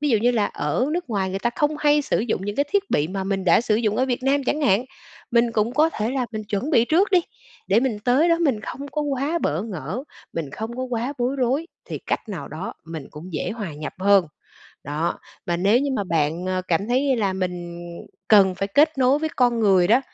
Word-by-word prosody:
ví 295 Hz, -, 0 dB
dụ 225 Hz, -, +4 dB
như 240 Hz, +4 st, +3 dB
là 220 Hz, -4 st, +1 dB
ở 155 Hz, -, -1 dB
nước 350 Hz, -6 st, -3 dB
ngoài 195 Hz, -3 st, 0 dB
người 190 Hz, -, -2 dB
ta 240 Hz, +4 st, 0 dB
không 300 Hz, 0 st, +1 dB
hay 295 Hz, 0 st, +3 dB
sử -, -, 0 dB
dụng 215 Hz, -4 st, -1 dB
những 205 Hz, +1 st, -4 dB
cái 285 Hz, -, +2 dB
thiết 405 Hz, 0 st, 0 dB
bị 150 Hz, +2 st, +1 dB
mà 190 Hz, +1 st, -3 dB
mình 195 Hz, -1 st, -2 dB
đã 175 Hz, +2 st, +5 dB
sử 225 Hz, -2 st, +1 dB
dụng 215 Hz, -2 st, 0 dB
ở 260 Hz, -, +2 dB
Việt 250 Hz, -1 st, -2 dB
Nam 275 Hz, +1 st, +2 dB
chẳng 295 Hz, +4 st, 0 dB
hạn, 235 Hz, -3 st, +3 dB, 0.5 s
mình 235 Hz, 0 st, +3 dB
cũng 220 Hz, +2 st, +1 dB
có 310 Hz, +3 st, +4 dB
thể 220 Hz, -6 st, -2 dB
là 260 Hz, -2 st, -1 dB
mình 215 Hz, -1 st, -4 dB
chuẩn 210 Hz, +7 st, -2 dB
bị 235 Hz, -7 st, +5 dB
trước 355 Hz, +10 st, +2 dB
đi, 370 Hz, -2 st, +5 dB, 0.5 s
để 200 Hz, +4 st, +4 dB
mình 245 Hz, -5 st, -1 dB
tới 270 Hz, +7 st, +4 dB
đó 335 Hz, -, +3 dB
mình 275 Hz, -10 st, +1 dB
không 280 Hz, +6 st, -7 dB
có 300 Hz, +2 st, -2 dB
quá 285 Hz, +3 st, -1 dB
bỡ 165 Hz, -, -1 dB
ngỡ, 195 Hz, -, -5 dB, 0.3 s
mình 160 Hz, -4 st, -4 dB
không 225 Hz, -, -6 dB
có 255 Hz, -, -3 dB
quá 250 Hz, +1 st, -2 dB
bối 250 Hz, +3 st, 0 dB
rối 265 Hz, +5 st, 0 dB, 0.2 s
thì -, -, -5 dB
cách -, -, -3 dB
nào 170 Hz, -9 st, -6 dB
đó 155 Hz, +6 st, -6 dB
mình 160 Hz, -4 st, -7 dB
cũng 170 Hz, +5 st, -10 dB
dễ 155 Hz, -, -2 dB
hòa 210 Hz, -8 st, -5 dB
nhập 150 Hz, +1 st, -6 dB
hơn. 200 Hz, -2 st, +5 dB, 0.6 s
Đó, 150 Hz, +4 st, -2 dB, 0.3 s
mà 175 Hz, -, 0 dB
nếu 200 Hz, +7 st, +3 dB
như 280 Hz, +1 st, -1 dB
mà 205 Hz, -, -1 dB
bạn, 165 Hz, 0 st, 0 dB
ờ, 185 Hz, 0 st, -1 dB
cảm 190 Hz, +5 st, +1 dB
thấy 260 Hz, +2 st, +2 dB
là 200 Hz, -4 st, 0 dB
mình 185 Hz, -1 st, -2 dB, 0.8 s
cần 195 Hz, -3 st, +6 dB
phải 195 Hz, +2 st, -3 dB
kết 295 Hz, +7 st, +3 dB
nối 260 Hz, +2 st, +4 dB
với 315 Hz, +1 st, -1 dB
con 240 Hz, -2 st, +3 dB
người 190 Hz, -4 st, +4 dB
đó, 235 Hz, +5 st, +5 dB
225 Hz, 245 wpm, -23 LUFS, 190-270 Hz, 0.8 s, cần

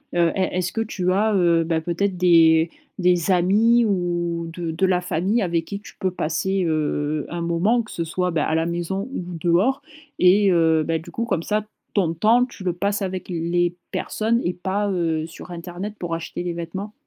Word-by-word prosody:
heu, 170 Hz, -1 st, +3 dB
est 185 Hz, -1 st, -1 dB
est-ce 180 Hz, -1 st, -1 dB
que 225 Hz, -, -1 dB
tu 185 Hz, -4 st, -1 dB
as, 210 Hz, +2 st, +2 dB
heu, 170 Hz, -2 st, +3 dB
bah, 165 Hz, 0 st, 0 dB
peut-être 180 Hz, +3 st, -1 dB
des 165 Hz, -2 st, +5 dB, 0.3 s
des 180 Hz, -1 st, +2 dB
amis 215 Hz, +7 st, +4 dB
ou 175 Hz, -3 st, -1 dB
de 170 Hz, -1 st, -4 dB
de 165 Hz, +4 st, +1 dB
la 180 Hz, -1 st, +2 dB
famille 185 Hz, +6 st, 0 dB
avec 170 Hz, -2 st, 0 dB
qui 200 Hz, +2 st, -5 dB
tu -, -, -13 dB
peux 190 Hz, -, +1 dB
passer, 185 Hz, +3 st, -1 dB
heu, 150 Hz, -1 st, -1 dB
un 170 Hz, 0 st, -4 dB
moment 180 Hz, +8 st, +1 dB
que 215 Hz, -, -13 dB
ce 170 Hz, -, -3 dB
soit, 180 Hz, +2 st, -1 dB
bah, 155 Hz, -2 st, 0 dB
à 160 Hz, -, 0 dB
la 160 Hz, -, +1 dB
maison 175 Hz, +5 st, -3 dB
ou 185 Hz, -, -3 dB, 0.2 s
dehors? 195 Hz, -, +2 dB, 0.3 s
Et 195 Hz, +2 st, +5 dB
heu, 160 Hz, -2 st, +3 dB
bah, 165 Hz, 0 st, 0 dB
du 160 Hz, -, -10 dB
coup, 230 Hz, -, -2 dB
comme 170 Hz, -7 st, -1 dB
ça, 210 Hz, 0 st, 0 dB, 0.3 s
ton 175 Hz, -6 st, +1 dB
temps, 230 Hz, +8 st, +4 dB
tu 240 Hz, -5 st, -11 dB
le 180 Hz, -2 st, 0 dB
passes 200 Hz, +3 st, -1 dB
avec 185 Hz, -1 st, -4 dB
les 175 Hz, +1 st, 0 dB, 0.2 s
personnes 230 Hz, +2 st, 0 dB
et 175 Hz, -, 0 dB
pas, 195 Hz, +3 st, -2 dB
heu, 165 Hz, -4 st, -1 dB
sur 170 Hz, +2 st, -11 dB
internet 175 Hz, +4 st, -6 dB
pour 170 Hz, -2 st, -3 dB
acheter 165 Hz, +1 st, -5 dB
des 175 Hz, -, -2 dB
vêtements. 185 Hz, +5 st, -6 dB
175 Hz, 205 wpm, -22 LUFS, 170-195 Hz, 0.3 s, des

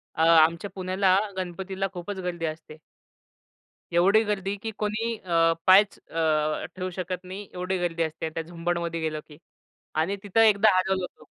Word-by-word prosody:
अ, 160 Hz, -, -1 dB
आमच्या 165 Hz, +3 st, +4 dB
पुण्याला 185 Hz, 0 st, +2 dB, 0.2 s
गणपतीला 190 Hz, +1 st, -3 dB
खूपच 185 Hz, +3 st, -6 dB
गर्दी 170 Hz, -2 st, -3 dB
असते. 155 Hz, 0 st, -7 dB, 1.1 s
एवढी 195 Hz, +6 st, +5 dB
गर्दी 200 Hz, -1 st, -2 dB
की 225 Hz, -, -3 dB
कोणी 220 Hz, +2 st, -1 dB
अ, 165 Hz, -3 st, +2 dB
पायच 195 Hz, +2 st, +6 dB
अ, 155 Hz, -2 st, -1 dB
ठेवू 185 Hz, 0 st, -3 dB
शकत 185 Hz, 0 st, -5 dB
नाही. 195 Hz, +2 st, -8 dB
एवढी 180 Hz, +1 st, -2 dB
गर्दी 170 Hz, -1 st, -1 dB
असते 160 Hz, 0 st, -4 dB
त्या 160 Hz, +1 st, -4 dB
झुंबडमध्ये 170 Hz, 0 st, -3 dB
गेलो 155 Hz, -1 st, -2 dB
की, 150 Hz, -2 st, -14 dB, 0.6 s
आणि 160 Hz, +6 st, 0 dB
तिथं 205 Hz, +3 st, +2 dB
एकदा 215 Hz, -1 st, +6 dB
हरवलो 190 Hz, +1 st, +1 dB
होतो. -, -, -9 dB
180 Hz, 155 wpm, -26 LUFS, 165-195 Hz, 1.1 s, पायच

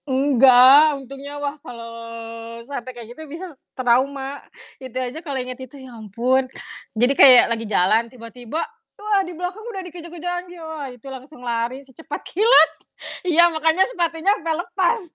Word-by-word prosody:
Enggak, 270 Hz, +2 st, +6 dB
untungnya 275 Hz, +2 st, -9 dB
wah 290 Hz, -1 st, -3 dB
kalau 235 Hz, -6 st, -9 dB, 0.8 s
sampe 255 Hz, -2 st, -6 dB
kayak 240 Hz, -2 st, -10 dB
gitu 315 Hz, -, -13 dB
bisa 335 Hz, +6 st, -7 dB
s 275 Hz, -, -29 dB, 0.2 s
trauma. 270 Hz, +3 st, 0 dB, 0.4 s
Itu 255 Hz, -1 st, -8 dB
aja 255 Hz, +5 st, -4 dB
kalau 285 Hz, -5 st, -5 dB
inget 255 Hz, 0 st, -6 dB
itu 260 Hz, +2 st, -10 dB
ya 260 Hz, -2 st, -12 dB
ampun, 240 Hz, +4 st, -1 dB, 0.5 s
jadi 245 Hz, +4 st, +3 dB
kayak 260 Hz, -3 st, +8 dB
lagi 230 Hz, 0 st, -4 dB
jalan 215 Hz, +4 st, +2 dB
tiba-tiba, 245 Hz, +5 st, -6 dB, 0.3 s
wah 415 Hz, -1 st, +1 dB
di 355 Hz, -3 st, -7 dB
belakang 360 Hz, +4 st, -5 dB
udah 435 Hz, -4 st, -6 dB
dikejar-kejar 345 Hz, 0 st, -7 dB
anjing, 355 Hz, 0 st, -14 dB
wah 310 Hz, -4 st, -6 dB
itu 250 Hz, -1 st, -15 dB
langsung 265 Hz, 0 st, -10 dB
lari 240 Hz, +3 st, -3 dB
secepat 265 Hz, +5 st, -8 dB
kilat. 440 Hz, +7 st, +5 dB, 0.6 s
Iya, 340 Hz, 0 st, +5 dB
makanya 320 Hz, +3 st, +2 dB
sepatunya 345 Hz, -3 st, 0 dB
sampe 330 Hz, -5 st, -2 dB
lepas, 355 Hz, +6 st, 0 dB
275 Hz, 155 wpm, -21 LUFS, 250-335 Hz, 0.8 s, kayak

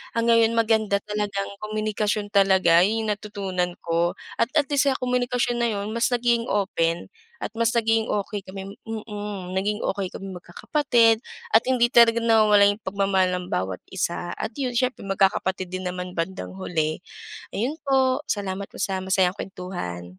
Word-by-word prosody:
ang 230 Hz, -, +1 dB
ngayon 230 Hz, 0 st, +4 dB
maganda 220 Hz, -3 st, +2 dB
talagang 205 Hz, -1 st, -3 dB
komunikasyon 215 Hz, -1 st, -1 dB
talaga 190 Hz, -4 st, +5 dB
'yun 220 Hz, +3 st, +1 dB
'yung 215 Hz, -, -2 dB
natutunan 195 Hz, -4 st, -3 dB
ko 170 Hz, +1 st, 0 dB, 0.2 s
at -, -, +3 dB
at 295 Hz, -3 st, +3 dB
least 285 Hz, 0 st, +3 dB
sa 265 Hz, -, +3 dB
komunikasyon 245 Hz, -1 st, 0 dB
na 235 Hz, -, +2 dB
'yun 205 Hz, 0 st, -3 dB
mas 230 Hz, +1 st, +1 dB
naging 240 Hz, -1 st, +1 dB
open 170 Hz, -4 st, 0 dB, 0.3 s
at 215 Hz, -, -6 dB
mas 230 Hz, 0 st, +1 dB
naging 225 Hz, -1 st, +1 dB
okey 205 Hz, 0 st, -2 dB
kami 195 Hz, +1 st, -8 dB
mm. 210 Hz, -4 st, -6 dB
Naging 205 Hz, +2 st, 0 dB
okey 195 Hz, -2 st, -2 dB
kaming 195 Hz, -1 st, -8 dB
magkakapatid 230 Hz, -, +2 dB, 0.3 s
at 220 Hz, -, +7 dB
hindi 250 Hz, -2 st, +4 dB
talaga 235 Hz, -1 st, +7 dB
nawawala 215 Hz, -3 st, +5 dB
'yung 205 Hz, +2 st, +1 dB
pagmamahal 190 Hz, -1 st, +1 dB
ng 180 Hz, -, -6 dB
bawat 95 Hz, 0 st, -1 dB, 0.2 s
isa 175 Hz, -1 st, -2 dB
at -, -, -4 dB
'yun 255 Hz, -3 st, -2 dB
siyempre 255 Hz, -2 st, -1 dB
magkakapatid 190 Hz, -1 st, +1 dB
din 185 Hz, +1 st, -5 dB
naman 180 Hz, 0 st, -5 dB
bandang 185 Hz, +3 st, -3 dB
huli. 160 Hz, -4 st, -1 dB, 0.6 s
Ayun 270 Hz, +10 st, -2 dB
po, 265 Hz, -1 st, +2 dB
salamat 200 Hz, -1 st, -3 dB
po -, -, -15 dB
sa 190 Hz, -2 st, -1 dB
masayang 190 Hz, -1 st, +2 dB
kuwentuhan. 180 Hz, -, -6 dB
205 Hz, 160 wpm, -24 LUFS, 190-230 Hz, 0.6 s, at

